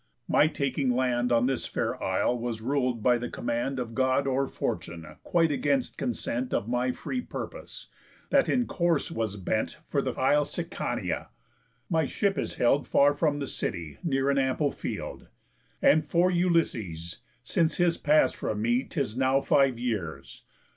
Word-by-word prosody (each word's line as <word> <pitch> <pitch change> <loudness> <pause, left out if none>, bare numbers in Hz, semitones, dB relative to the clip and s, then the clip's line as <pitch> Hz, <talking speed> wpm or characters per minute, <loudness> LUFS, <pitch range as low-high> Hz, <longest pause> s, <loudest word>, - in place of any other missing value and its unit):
My 150 - +4
taking 140 -3 -1
land 125 -1 +1
On 120 0 +4
this 130 0 -1
fair - - -2
Isle 125 - +1
was 120 -2 -3
rul'd 125 -2 -1
by 125 -1 +4
the 120 - -4
command 120 +3 -2
Of 120 -2 -4
God 130 +2 +2
or 135 0 +1
fortune, 85 -8 -4 0.2
quite 165 -2 +2
against 140 -2 0
consent 125 +1 -2
Of 110 - -1
my 125 +1 +1
free 250 - -4
purpose, - - -7 0.5
that 280 -1 +4
in 250 -1 +2
course 170 -7 0
was 110 -3 -2
bent 105 +6 -2
For 140 - +1
th' 130 -3 -3
isle 145 +3 +3
Sicania. 165 +4 -3 0.6
My 160 -4 +1
ship 200 -2 0
is - - -3
held 135 +4 +2
Far 145 +1 +4
from 145 0 +1
the 140 - -3
city, 85 - -4
near 135 -4 +1
an 140 - +2
ample 135 +2 +1
field. - - -6 0.6
And 155 +1 +5
for 170 +5 +2
Ulysses, 115 - 0 0.2
since 165 -1 +1
his 175 -1 +2
pass 150 +1 +4
from 105 - -3
me 120 +4 +2
'Tis 135 -7 -3
now 130 +1 +3
five 135 -2 +3
years. 95 - -4
135 Hz, 160 wpm, -28 LUFS, 120-150 Hz, 0.6 s, And